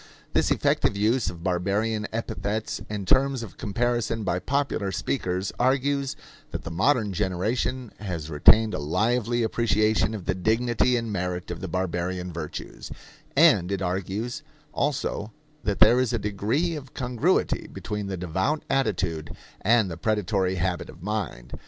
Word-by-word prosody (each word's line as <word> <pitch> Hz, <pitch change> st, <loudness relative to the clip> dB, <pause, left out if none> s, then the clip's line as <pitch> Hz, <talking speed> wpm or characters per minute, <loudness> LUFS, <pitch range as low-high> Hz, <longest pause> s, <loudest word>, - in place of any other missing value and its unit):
This -, -, +3 dB
effective -, -, +2 dB
use 110 Hz, +4 st, +2 dB
of 85 Hz, -1 st, -9 dB
barbarian 100 Hz, +4 st, 0 dB
epithets 110 Hz, -1 st, -3 dB
and 105 Hz, -3 st, -4 dB
terms 135 Hz, 0 st, +3 dB
of 105 Hz, -, -10 dB
comparison 115 Hz, +1 st, 0 dB
by 90 Hz, -2 st, 0 dB
popular 130 Hz, -3 st, -1 dB
speakers 95 Hz, -2 st, -1 dB
argues 135 Hz, +2 st, +1 dB, 0.3 s
that -, -, -5 dB
the 85 Hz, -, -6 dB
modern 105 Hz, -, +2 dB
generation 110 Hz, +7 st, -1 dB
has 90 Hz, -7 st, -4 dB
retained 110 Hz, +9 st, +5 dB
a -, -, -2 dB
lively 115 Hz, +9 st, +1 dB
appreciation 110 Hz, -1 st, +2 dB
of 95 Hz, -5 st, -7 dB
the 95 Hz, -, +1 dB
dignity 120 Hz, +5 st, +2 dB
and 115 Hz, -2 st, -3 dB
merit 90 Hz, -2 st, -3 dB
of 85 Hz, -, -5 dB
the 95 Hz, -, -4 dB
barbarian 90 Hz, 0 st, -2 dB
virtues; 80 Hz, -2 st, -6 dB, 0.5 s
and 135 Hz, -, +5 dB
it 100 Hz, -1 st, -1 dB
argues 95 Hz, -, -2 dB, 0.3 s
also 120 Hz, -6 st, -1 dB, 0.3 s
that 100 Hz, -2 st, 0 dB
there 120 Hz, +3 st, +7 dB
is 125 Hz, -2 st, +1 dB
a -, -, +2 dB
degree 110 Hz, -, 0 dB
of 135 Hz, -3 st, -9 dB
congruity 125 Hz, -3 st, +1 dB
between 105 Hz, -1 st, -4 dB
the 95 Hz, -1 st, -3 dB
devout 95 Hz, -, -1 dB
attitude 90 Hz, -, 0 dB, 0.3 s
and 110 Hz, -3 st, +3 dB
the 85 Hz, -, -5 dB
predatory 100 Hz, -2 st, 0 dB
habit 90 Hz, 0 st, -1 dB
of -, -, -12 dB
mind. 95 Hz, -, -3 dB
105 Hz, 145 wpm, -26 LUFS, 90-120 Hz, 0.5 s, there